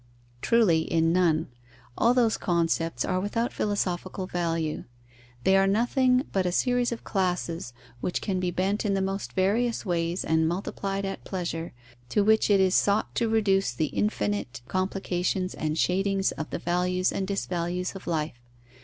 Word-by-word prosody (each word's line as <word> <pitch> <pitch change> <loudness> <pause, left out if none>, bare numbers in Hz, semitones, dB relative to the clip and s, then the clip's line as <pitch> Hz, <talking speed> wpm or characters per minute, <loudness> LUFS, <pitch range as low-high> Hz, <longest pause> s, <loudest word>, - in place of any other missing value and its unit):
Truly, 215 -9 +4
in 165 0 +1
none. 170 -4 +2 0.5
All 235 +2 +3
those 235 -3 +3
concepts 165 -1 0
are 185 0 0
without 230 +5 -1
philosophical 190 -2 -2
value. 165 -3 -2 0.6
They 190 - +4
are 195 0 +4
nothing 250 +5 +3
but 190 -2 +1
a - - 0
series 245 +5 +1
of 235 - -5
classes, 180 - -2 0.3
which 175 - -2
can 190 -3 -2
be 180 -1 0
bent 190 +4 0
in 200 -2 +1
the 195 - 0
most 195 +1 -3
various 220 +6 +1
ways 170 -1 -1
and 160 0 +2
multiplied 195 +2 -3
at 195 - -5
pleasure, 170 -3 -4 0.4
to 205 - +2
which 220 +1 +3
it 200 -1 +5
is 190 -1 +3
sought 205 +2 +2
to 230 -2 0
reduce 195 - +2
the 155 +5 -2
infinite 105 +4 -1
complications 185 0 -1
and 155 0 -2
shadings 195 +2 +1
of 155 - -5
the - - -3
values 180 +1 0
and 190 - -2
disvalues 180 -2 -2
of 195 - -9
life. 155 -6 -2
185 Hz, 160 wpm, -27 LUFS, 170-200 Hz, 0.6 s, it